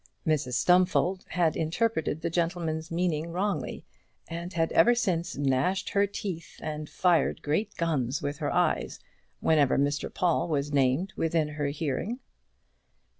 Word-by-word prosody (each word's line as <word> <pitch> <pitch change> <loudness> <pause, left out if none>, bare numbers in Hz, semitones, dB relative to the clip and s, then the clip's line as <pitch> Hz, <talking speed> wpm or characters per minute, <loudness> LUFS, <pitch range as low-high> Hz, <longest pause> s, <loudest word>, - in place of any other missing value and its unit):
Mrs 150 -5 0
Stumfold 180 +3 +3
had 170 -3 +1
interpreted 160 -1 0
the 170 - -2
gentleman's 165 -2 -1
meaning 170 -1 -1
wrongly, 185 -4 -2 0.4
and 170 +2 -5
had 165 -2 0
ever 240 +9 +5
since 175 -8 -1
gnashed 140 +8 +1
with - - -10
her 200 0 +3
teeth 190 -5 -6
and 155 -1 -5
fired 175 -3 +2
great 200 +9 -1
guns 145 -6 0
with 145 +1 -4
her 150 - -1
eyes - - 0 0.4
whenever 150 -4 +3
Mr 145 +1 0
Paul 175 -2 +1
was 145 -2 -1
named 140 +7 +2
within 160 -2 +1
her 145 -1 -2
hearing. 150 - -2
165 Hz, 140 wpm, -28 LUFS, 150-180 Hz, 0.4 s, ever